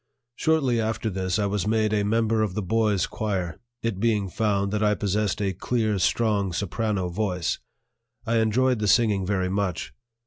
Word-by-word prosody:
Shortly 135 Hz, -8 st, +2 dB
after 110 Hz, 0 st, -2 dB
this 95 Hz, 0 st, -1 dB
I 105 Hz, -, +1 dB
was 100 Hz, -1 st, -1 dB
made 110 Hz, -1 st, +1 dB
a 105 Hz, -, +2 dB
member 110 Hz, +1 st, +1 dB
of 105 Hz, -4 st, -1 dB
the 105 Hz, -, -1 dB
boys' 105 Hz, 0 st, +1 dB
choir, 95 Hz, -5 st, -3 dB, 0.2 s
it 115 Hz, -5 st, -2 dB
being 105 Hz, -3 st, +1 dB
found 100 Hz, 0 st, 0 dB
that 105 Hz, 0 st, -1 dB
I 105 Hz, -1 st, +3 dB
possessed 105 Hz, 0 st, -1 dB
a 95 Hz, -1 st, 0 dB
clear, 110 Hz, +1 st, 0 dB
strong 100 Hz, -1 st, +1 dB
soprano 100 Hz, 0 st, -1 dB
voice. 90 Hz, -2 st, -1 dB, 0.7 s
I 115 Hz, 0 st, +1 dB
enjoyed 120 Hz, +3 st, +2 dB
the 105 Hz, -, 0 dB
singing 100 Hz, -3 st, +3 dB
very 95 Hz, -2 st, 0 dB
much. 95 Hz, -2 st, -2 dB
105 Hz, 170 wpm, -25 LUFS, 95-110 Hz, 0.7 s, I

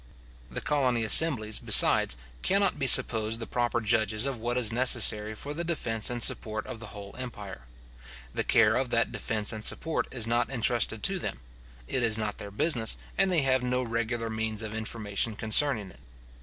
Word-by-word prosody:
The 60 Hz, -, -6 dB
colony 130 Hz, -6 st, -1 dB
assemblies, 110 Hz, -2 st, +6 dB
besides, -, -, +3 dB, 0.2 s
cannot 195 Hz, -4 st, 0 dB
be 135 Hz, -, -1 dB
supposed 110 Hz, -2 st, +4 dB
the 115 Hz, -, -6 dB
proper 120 Hz, 0 st, -2 dB
judges 110 Hz, 0 st, 0 dB
of 135 Hz, -4 st, -4 dB
what 120 Hz, +2 st, -3 dB
is 115 Hz, -3 st, +2 dB
necessary 110 Hz, -4 st, +3 dB
for 145 Hz, +7 st, -7 dB
the 170 Hz, +3 st, -5 dB
defence 115 Hz, -10 st, -1 dB
and 120 Hz, -1 st, -3 dB
support 110 Hz, 0 st, +1 dB
of 115 Hz, -, -9 dB
the 115 Hz, -, -9 dB
whole 100 Hz, -1 st, -11 dB
empire. 105 Hz, -, -9 dB, 0.7 s
The -, -, -2 dB
care 110 Hz, 0 st, +2 dB
of 130 Hz, -1 st, -2 dB
that 115 Hz, -1 st, 0 dB
defence 110 Hz, -2 st, -1 dB
and 110 Hz, -1 st, -8 dB
support 160 Hz, +6 st, -1 dB
is 120 Hz, -4 st, -4 dB
not 120 Hz, +1 st, -1 dB
entrusted 120 Hz, -3 st, -1 dB
to 195 Hz, -1 st, +2 dB
them. 65 Hz, -, -6 dB, 0.5 s
It 130 Hz, -, -1 dB
is 115 Hz, -2 st, 0 dB
not 105 Hz, -1 st, -4 dB
their 100 Hz, -, -8 dB
business, 115 Hz, +2 st, -1 dB, 0.2 s
and 195 Hz, -, +2 dB
they 170 Hz, -5 st, +2 dB
have 130 Hz, -1 st, +1 dB
no 125 Hz, 0 st, -2 dB
regular 115 Hz, 0 st, -4 dB
means 110 Hz, 0 st, -4 dB
of 110 Hz, -1 st, -7 dB
information 110 Hz, 0 st, -3 dB
concerning 110 Hz, -2 st, +2 dB
it. -, -, -20 dB
115 Hz, 185 wpm, -27 LUFS, 110-125 Hz, 0.7 s, assemblies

